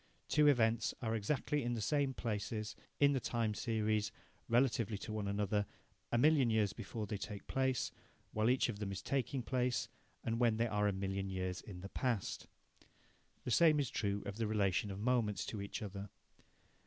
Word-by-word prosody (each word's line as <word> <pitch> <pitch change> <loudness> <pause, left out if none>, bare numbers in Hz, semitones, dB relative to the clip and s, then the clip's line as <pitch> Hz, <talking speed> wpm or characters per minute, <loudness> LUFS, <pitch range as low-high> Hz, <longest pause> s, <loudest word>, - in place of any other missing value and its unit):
Two 150 -1 +4
events 115 -5 +3
are 110 -1 0
exactly 145 +6 0
in 120 -1 -1
the - - -3
same 140 +4 +1
places 105 -1 -3 0.2
in 145 0 +6
the 135 - +1
time 115 -3 0
series, 110 -1 0 0.4
relatively 115 -3 +2
to 110 - -6
one 105 -2 -2
another, 100 0 0 0.4
a 120 - +3
million 140 -1 +5
years 105 -3 +2
before 110 0 -5
they 105 -1 -4
take 100 0 -6
place, 130 -1 0 0.4
while 110 +2 +2
each 130 +1 +3
of 110 -4 -4
them 100 -2 -3
is 95 - -5
taking 135 -1 -1
place, 125 0 0 0.3
and 115 0 -1
when 115 -3 +3
they 115 - +2
are 105 -2 +1
a - - +3
million 95 0 -2
years 95 -1 -2
in 90 -4 -9
the 100 - -7
past. 120 -7 -2 1.0
The 125 - -3
same 155 +2 +6
is 140 -5 0
true 100 -1 -1
of 100 +1 -5
the 115 -1 0
relation 105 -1 +1
of 95 0 -5
moments 110 -4 +1
to 105 - -4
each 100 +3 -5
other. 100 0 -6
110 Hz, 185 wpm, -36 LUFS, 100-125 Hz, 1.0 s, in